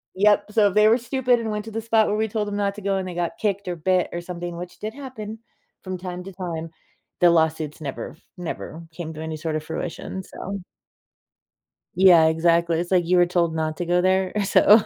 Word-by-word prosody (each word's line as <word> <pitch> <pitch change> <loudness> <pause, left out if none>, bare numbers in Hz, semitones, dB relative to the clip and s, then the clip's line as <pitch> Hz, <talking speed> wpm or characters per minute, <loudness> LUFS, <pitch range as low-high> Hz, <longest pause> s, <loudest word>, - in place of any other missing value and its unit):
Yep, 205 +1 +3
so 210 -2 +5
if 190 - -5
they 210 0 +6
were 230 +3 +5
stupid 245 0 +1
and 225 -1 -3
went 210 0 -3
to 225 - -8
the 225 +1 -3
spot 225 -1 +3
where 210 - 0
we 220 +1 0
told 210 0 -2
them 205 0 -3
not 200 -1 0
to 210 - -9
go, 195 0 0
and 185 -1 -2
they 180 - -6
got 170 -1 -2
kicked, 200 -2 -1
or 180 -1 -3
bit, 180 +2 +1
or 175 - -3
something, 175 -1 -6
which 180 +1 -8
did 215 +1 -5
happen 225 -5 -7 0.4
from 185 -1 -4
time 180 0 -6
to 195 - -8
time, 170 -3 -5 0.5
the 175 -1 +7
lawsuits 160 -2 +1
never 140 -3 -5
f 160 - -17 0.2
never 170 -1 -6
came 160 -1 -6
to 155 - -7
any 160 -1 -4
sort 155 0 -2
of 155 - -4
fruition. 175 +3 -5
So 195 +1 -6 1.4
Yeah, 175 -3 +7
exactly, 170 +1 +2
it's 175 - -4
like 180 -2 +3
you 180 0 +4
were 175 - +6
told 175 -2 +1
not 155 -1 -1
to 175 - -1
go 175 +1 +3
there. 185 0 +2
So 210 +3 +6
180 Hz, 230 wpm, -23 LUFS, 170-205 Hz, 1.4 s, the